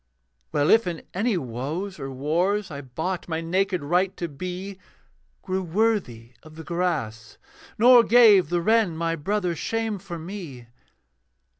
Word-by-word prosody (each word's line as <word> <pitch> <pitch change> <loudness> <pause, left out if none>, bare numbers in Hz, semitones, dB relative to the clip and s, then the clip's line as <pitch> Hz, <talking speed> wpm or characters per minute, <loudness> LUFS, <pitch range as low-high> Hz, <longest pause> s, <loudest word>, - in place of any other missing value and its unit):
Well, 145 +1 +2
if 225 -3 +4
in 170 -2 -4
any 210 +2 0
woes 150 - -5
or 135 -1 -5
wars 170 +9 -1
I 140 -1 -6
bought 160 +8 -4
my 160 -1 -1
naked 180 +1 -1
right 180 +5 0
to 170 - -3
be, 185 +6 -7 0.6
Grew 190 0 -2
worthy 175 - -1
of 155 0 -15
the 160 - -9
grass, 150 -12 -3 0.4
nor 245 +2 +8
gave 215 -8 +6
The 175 -1 0
wren, 220 -6 +2
my 165 0 -1
brother, 180 +2 -1
shame 225 +3 -2
for 175 -2 -7
me. 165 -8 -8
175 Hz, 145 wpm, -24 LUFS, 155-200 Hz, 0.6 s, nor